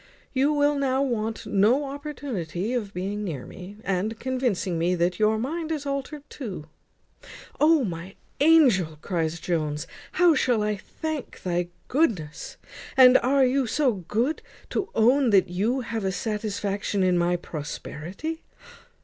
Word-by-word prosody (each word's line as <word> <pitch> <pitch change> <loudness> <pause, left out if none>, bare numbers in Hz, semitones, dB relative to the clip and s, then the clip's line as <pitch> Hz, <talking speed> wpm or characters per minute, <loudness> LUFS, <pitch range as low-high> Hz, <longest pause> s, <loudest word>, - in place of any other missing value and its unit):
You 275 +2 +3
will 290 0 +3
now 270 0 +1
want 225 -4 -2
no 225 +9 +3
opportunity 260 - -4
of 220 -5 -2
being 200 +3 -3
near 155 -10 -4
me, 190 +3 -10
and 195 +4 -1
convincing 240 -9 -1
me 175 +2 +2
that 175 +2 0
your 215 0 +3
mind 315 +7 -3
is 300 -3 -3
altered 280 +1 -4
too." 200 - -7 0.9
"O! 310 -1 +5
my 185 -1 -5 0.2
angel," 255 - +5
cries 170 -2 -1
Jones, 155 -3 -2 0.3
"how 355 -2 +5
shall 245 -6 +2
I 210 0 0
thank 310 +7 -6
thy 175 -1 0 0.2
goodness! 180 - -1 0.4
And 255 -1 +8
are 270 +1 +3
you 260 0 +1
so 275 +2 +2
good 220 - -1 0.3
to 395 - -1
own 250 +4 +4
that 195 -3 +4
you 215 +9 0
have 225 -2 -4
a 190 - 0
satisfaction 205 -1 -2
in 185 -1 +3
my 175 0 +2
prosperity? 175 - -6
220 Hz, 140 wpm, -25 LUFS, 180-275 Hz, 0.9 s, And